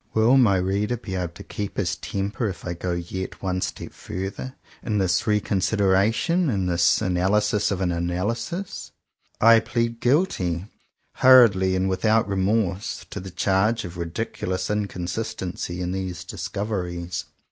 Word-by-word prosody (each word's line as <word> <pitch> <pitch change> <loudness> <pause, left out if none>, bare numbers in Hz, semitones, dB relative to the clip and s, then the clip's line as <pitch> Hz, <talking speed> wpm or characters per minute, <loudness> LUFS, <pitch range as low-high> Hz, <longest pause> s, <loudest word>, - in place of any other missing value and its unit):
Will 110 +4 +5
my 110 -8 +5
reader 100 +6 0
be 105 -4 -7
able 90 -2 -2
to - - -10
keep 105 -1 -5
his 95 -4 0
temper 100 +3 -3
if 95 - -8
I 85 - -2
go 90 +1 -3
yet 90 +3 -5
one 90 -1 -1
step 85 - -5
farther 95 +8 -6 0.3
in 105 -2 -1
this 90 -1 +1
re 105 -1 +3
con 100 -1 -1
sideration, 110 - +2
in 95 -4 0
this 85 0 +3
analysis 100 +3 +2
of 95 -1 -2
an 90 -2 +1
analysis 100 - -3 0.5
.f* - - +4
I 115 0 +9
plead 115 0 -2
guilty, 100 - +1 0.5
hurriedly 110 -8 +6
and 95 +1 +1
without 110 +4 +2
re 100 - -2
morse, 95 -1 0
to - - -4
the 95 - -7
charge 100 +5 +1
of 85 0 -8
ridiculous 90 +1 -3
inconsis 105 0 -3
tency 90 -1 -4
in 90 0 -2
these 90 -2 -4
discoveries. 90 -2 -4
95 Hz, 160 wpm, -24 LUFS, 90-110 Hz, 0.5 s, I